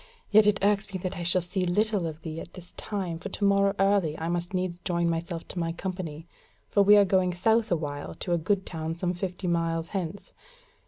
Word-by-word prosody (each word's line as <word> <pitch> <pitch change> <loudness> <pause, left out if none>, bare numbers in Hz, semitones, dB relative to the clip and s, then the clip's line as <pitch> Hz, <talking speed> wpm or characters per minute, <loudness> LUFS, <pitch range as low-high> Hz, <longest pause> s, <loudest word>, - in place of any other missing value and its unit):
Yet 210 0 +7
it 205 -1 +4
irks 205 0 +2
me 190 - -3
that 185 0 -3
I - - -5
shall 175 +1 +2
see 185 +2 -2
little 205 +3 +1
more 165 - -1
of 155 0 -11
thee 160 0 -5
at - - -11
this 180 -2 -12
time, 185 -6 -4
for - - -6
to - - -4
morrow 200 0 +4
early 195 -6 +2
I 165 +1 -3
must 175 0 -2
needs 180 -2 -2
join 170 -1 0
myself 165 0 -3
to 180 - -5
my 165 -1 -1
company; 170 -3 -5 0.4
for 200 - +4
we 205 +1 +7
are 200 - +6
going 185 -1 +2
south 220 +4 +2
awhile 145 -4 -2
to 175 - -2
a 170 - +2
good 190 +4 0
town 160 -1 -4
some 180 +1 -1
fifty 180 +1 -4
miles 165 -1 0
hence. 190 -1 -5
180 Hz, 225 wpm, -27 LUFS, 165-200 Hz, 0.4 s, Yet